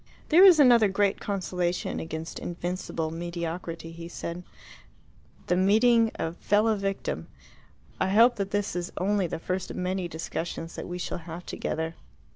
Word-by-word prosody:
"There 340 +4 +7
is 365 -5 +9
another 240 -6 +7
great 200 0 +1
consolation 180 -3 -2
against 160 0 -5
invincible 175 -2 -3
mediocrity," 170 0 -5
he 165 0 -8
said 170 0 -6 1.0
"the 180 - +1
meeting 225 +5 +4
a 165 - -3
fellow 210 +5 +2
victim. 195 -1 -3 0.7
I 185 - +1
hope 230 +4 +5
that 200 -1 -2
this 205 -1 -1
is 175 0 -3
only 195 0 +1
the - - -4
first 185 +3 -3
of - - -6
many 185 0 -1
discussions 165 0 -5
that - - -6
we 180 - -4
shall 180 - -4
have 170 +1 -8
together." 160 +1 -3
180 Hz, 150 wpm, -27 LUFS, 170-205 Hz, 1.0 s, is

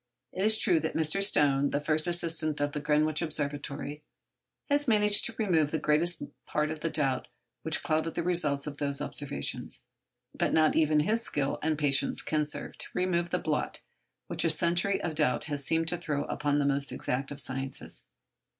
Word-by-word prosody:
It 190 - -2
is 215 +1 +5
true 180 -7 +4
that 160 +1 -3
Mr. 160 +5 +1
Stone, 140 -8 +3
the 145 - -1
first 155 +1 0
assistant 165 -3 0
at 145 0 0
the 150 - -2
Greenwich 150 +1 +1
Observatory, 145 -1 -3 0.7
has 290 0 +2
managed 210 -2 +4
to 225 - -2
remove 170 -9 +2
the 160 - -1
greater 150 +2 +2 0.4
part 150 +1 -1
of 155 - -5
the 165 - -2
doubts 135 -5 0 0.3
which 160 0 0
clouded 160 0 -1
the - - -1
results 155 -6 +1
of 145 -1 -7
those 140 -1 -1
observations. 135 - -5 0.5
But - - -1
not 155 -1 +3
even 155 -1 +3
his 220 +9 +1
skill 145 -9 0
and 155 -1 0
patience 140 -2 +1
can 155 -1 0
serve 150 - -7
to - - -3
remove 175 -1 0
the 180 - 0
blot 155 -3 -2 0.4
which - - -2
a 165 - +3
century 170 +5 +2
of 165 - -2
doubt 150 -4 +1
has 145 -2 -3
seemed 165 +3 0
to 175 - 0
throw 145 -2 -2
upon 145 -1 -1
the 145 - +1
most 140 0 +1
exact 135 +2 -2
of 145 - -5
the 140 - 0
sciences. 135 +1 -5
155 Hz, 190 wpm, -29 LUFS, 145-170 Hz, 0.7 s, is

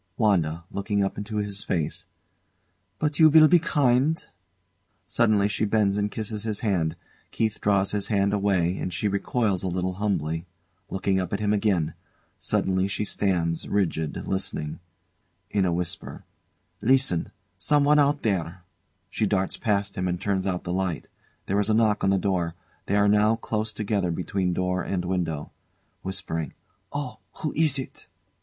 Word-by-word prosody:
WANDA. 85 -7 +2
[Looking 100 0 0
up 95 - -1
into 105 +1 -4
his 105 -1 -2
face] 80 -4 -2 0.9
But 150 -1 -1
you 160 -1 +8
will 155 0 +8
be 175 +2 +6
kind? 145 -2 +2 0.8
Suddenly 110 -4 +3
she 105 - -1
bends 105 -2 +2
and 105 0 0
kisses 105 0 -3
his 110 -2 -3
hand. 90 -8 0 0.3
KEITH 110 -1 -1
draws 100 -1 +2
his 105 -1 -2
hand 100 -2 +2
away, 95 -4 +2
and 90 - -3
she 105 - -1
recoils 100 0 0
a 95 - -1
little 90 +1 -1
humbly, 85 -4 -1 0.4
looking 95 0 0
up 90 0 -3
at 100 - 0
him 105 0 +1
again. 100 -7 +1 0.5
Suddenly 95 0 +1
she 105 +1 -2
stands 85 -5 0
rigid, 80 -6 -1
listening. 95 -5 -3 0.7
[In 100 -2 +2
a 90 - +1
whisper] 85 0 -4 0.6
Listen! 130 -8 +2 0.3
Someone 150 +6 +4
out 145 0 +2
there! 90 -4 -1 0.5
She 110 - 0
darts 95 -1 0
past 100 -2 0
him 90 0 -1
and 90 -1 -1
turns 100 -1 -1
out 90 -2 -1
the 90 - -3
light. 95 -4 -2 0.4
There 100 +2 +1
is 105 +1 0
a 110 - +4
knock 110 -2 +2
on 95 - +3
the 95 - +3
door. 90 -3 0 0.3
They 100 - +1
are 105 0 +4
now 105 +2 +4
close 110 -1 -2
together 105 -3 -1
between 90 +2 -1
door 90 +1 0
and 90 -2 -2
window. 85 -5 -2 0.5
[Whispering] 85 -5 -3 0.4
Oh! 145 -5 -4 0.2
Who 155 - -1
is 150 -3 +3
it? 130 - -7
100 Hz, 160 wpm, -26 LUFS, 90-110 Hz, 0.9 s, you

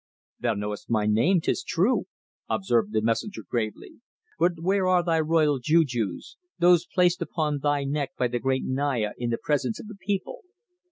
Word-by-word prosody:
"Thou 120 -2 0
knowest 105 0 -5
my 110 -3 +1
name, 120 - +3
'tis 190 - 0
true," 195 +10 +1 0.4
observed 115 - +1
the 110 -1 0
messenger 115 - -1
gravely. 110 - -4 0.4
"But 175 - +3
where 190 +2 +1
are 180 -1 +3
thy 165 -2 +1
royal 155 -3 +2
jujus; 125 - 0 0.2
those 175 -1 +4
placed 180 0 +2
upon 155 -3 -1
thy 145 0 +1
neck 140 -1 -2
by 125 - +1
the 120 0 -2
great 130 +1 0
Naya 130 -5 0
in 120 -1 -2
the 115 - 0
presence 130 -6 -1
of - - -9
the 215 -1 -10
people?" 205 - -3
145 Hz, 170 wpm, -26 LUFS, 120-175 Hz, 0.4 s, those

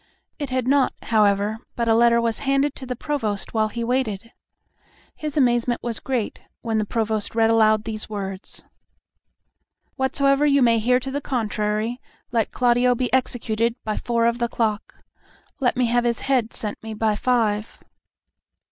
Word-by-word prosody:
It 285 -3 -3
had 255 -1 -1
not, 275 0 +3
however, 210 -1 +2 0.2
but 235 -1 -1
a 225 - +4
letter 235 +1 +5
was 230 -1 -1
banded 275 +1 +1
to 260 - -10
the 250 - -3
Provost 225 -7 -2
while 220 -1 +2
he 235 +2 -4
waited. 230 -3 -2 0.8
His 305 -1 -5
amazement 240 -2 +2
was 235 -2 -3
great 250 -5 -3 0.2
when 225 -2 0
the 215 - 0
Provost 220 -1 -1
read 225 0 +4
aloud 215 -1 +4
these 220 -1 -5
words, 195 -2 -6 1.3
"Whatsoever 275 +1 +2
you 280 -2 +4
may 230 -1 +4
hear 250 +3 +3
to 265 +1 -6
the 285 +2 -2
contrary, 220 -1 -2 0.3
let 230 -3 +1
Claudio 245 0 +2
be 250 0 -2
executed 235 -3 0
by 215 -1 -2
four 235 -1 0
of 235 +1 +1
the 235 - +1
clock. 220 -3 -2 0.6
Let 250 -3 +1
me 255 - +3
have 240 +1 +2
his 235 -1 0
head 255 -5 +1
sent 210 -2 -5
me 220 -1 -7
by 215 0 +1
five." 220 -3 0
235 Hz, 165 wpm, -23 LUFS, 220-255 Hz, 1.3 s, letter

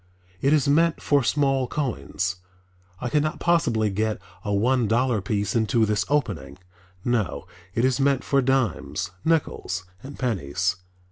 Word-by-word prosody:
It 140 - +3
is 150 -2 +3
meant 165 +3 +3
for 145 -1 +2
small 135 0 +1
coins, 95 - -2 0.6
I 125 - -3
could 150 +4 +2
not 155 +1 -2
possibly 120 -12 +2
get 110 +2 -1 0.2
a 105 - -2
one 120 +4 +2
dollar 120 0 +2
piece 100 +1 -1
into 115 0 +3
this 105 0 0
opening. 100 - -1 0.5
No, 110 - 0 0.3
it 115 - +2
is 130 0 +1
meant 135 -1 +2
for 140 -1 +2
dimes, 120 -8 0
nickels 145 - 0 0.2
and 140 +1 -9
pennies. 90 - -1
120 Hz, 145 wpm, -24 LUFS, 100-140 Hz, 0.6 s, It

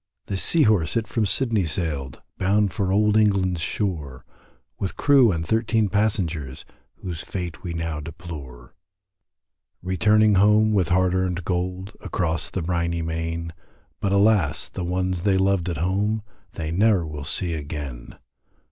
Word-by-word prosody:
The 100 - -3
Sea 155 - +3
Horse 105 - +2
it 115 -2 -1
from 110 -2 0
Sydney 110 -4 +1
sailed, 75 -6 -3 0.2
Bound 100 +1 +2
for 100 -4 -1
Old 105 +1 +3
England's 95 -5 +2
shore, 75 - -3 0.5
With 95 - -3
crew 135 -6 +5
and 85 -2 -2
thirteen 110 +1 +1
passengers, 90 -9 -1 0.3
Whose 85 -3 -6
fate 90 -5 -5
we 85 -2 -5
now 80 -2 -3
deplore; 75 -6 -9 1.1
Returning 105 +3 +3
home 105 +1 +4
with 95 -5 +2
hard 90 0 +3
earned 90 -2 -1
gold, 90 +2 -3
Across 80 -4 -2
the 95 - -3
briney 85 -1 -1
main, 80 0 -3 0.5
But 100 - -1
alas! 100 -7 +2
the 95 - -5
ones 90 0 -1
they 95 0 +2
loved 95 -2 +1
at 85 - -3
home, 100 +6 0 0.3
They 80 -1 -4
ne'er 100 -1 +3
will 75 -2 -6
see 85 +4 -2
again. 70 -5 -6
90 Hz, 145 wpm, -24 LUFS, 80-105 Hz, 1.1 s, crew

